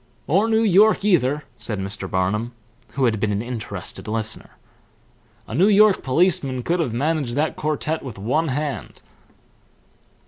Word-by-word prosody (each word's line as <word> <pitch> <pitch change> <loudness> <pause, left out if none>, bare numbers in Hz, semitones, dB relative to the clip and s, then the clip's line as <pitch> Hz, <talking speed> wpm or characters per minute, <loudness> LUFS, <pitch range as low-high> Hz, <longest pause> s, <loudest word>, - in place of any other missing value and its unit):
"Or 195 +9 +2
New 220 0 +3
York 210 +1 +4
either," 150 -7 +2
said 110 -1 -4
Mr. 95 0 -4
Barnum, 105 +6 -1 0.4
who 135 -1 +1
had 110 -3 +1
been 105 0 0
an 100 +2 -1
interested 110 -7 -6
listener. 110 0 -3 0.9
"A - - -8
New 175 - +4
York 210 -1 +5
policeman 140 -3 +1
could 175 +6 0
have 155 -8 0
managed 140 0 -1
that 150 +2 0
quartet 155 +1 -2
with 130 -6 -8
one 130 +11 0
hand." 145 +1 -4
135 Hz, 145 wpm, -22 LUFS, 110-170 Hz, 0.9 s, York